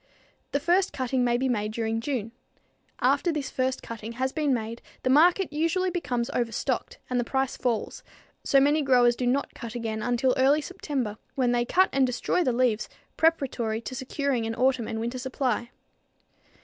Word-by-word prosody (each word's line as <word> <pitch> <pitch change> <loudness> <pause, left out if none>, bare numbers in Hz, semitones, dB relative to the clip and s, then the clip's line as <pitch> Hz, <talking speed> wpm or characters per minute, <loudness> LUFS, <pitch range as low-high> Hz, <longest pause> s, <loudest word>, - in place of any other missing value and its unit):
The 285 - +1
first 355 +6 +2
cutting 255 -1 0
may 240 -1 +2
be 265 +2 0
made 215 -4 -1
during 225 0 -1
June. 230 -4 -3 0.7
After 345 - +3
this 295 -4 -3
first 260 0 -1
cutting 230 0 -7
has 260 +2 -1
been 300 -2 0
made 230 -1 -2 0.2
the 255 - +2
market 340 +4 +4
usually 335 +4 +1
becomes 250 -9 -2
overstocked 235 -1 -2
and 250 -1 0
the - - +1
price 265 +2 -1
falls, 235 -3 -2 0.4
so 275 - +4
many 290 +3 +3
growers 245 -3 +4
do 245 0 -2
not 275 +3 0
cut 235 -1 -8
again 220 -2 -3
until 245 +2 +1
early 275 +3 +4
September 280 - -4 0.2
when 250 -3 +2
they 240 0 +1
cut 375 +8 +3
and 270 -1 +3
destroy 250 +8 0
the 255 - +2
leaves 235 -3 +1 0.3
preparatory 260 -9 +1
to 245 - -7
securing 260 -2 -1
an 225 - -3
autumn 250 -1 +1
and 220 - -3
winter 235 +3 -3
supply. 255 -2 -1
255 Hz, 175 wpm, -27 LUFS, 235-280 Hz, 0.7 s, market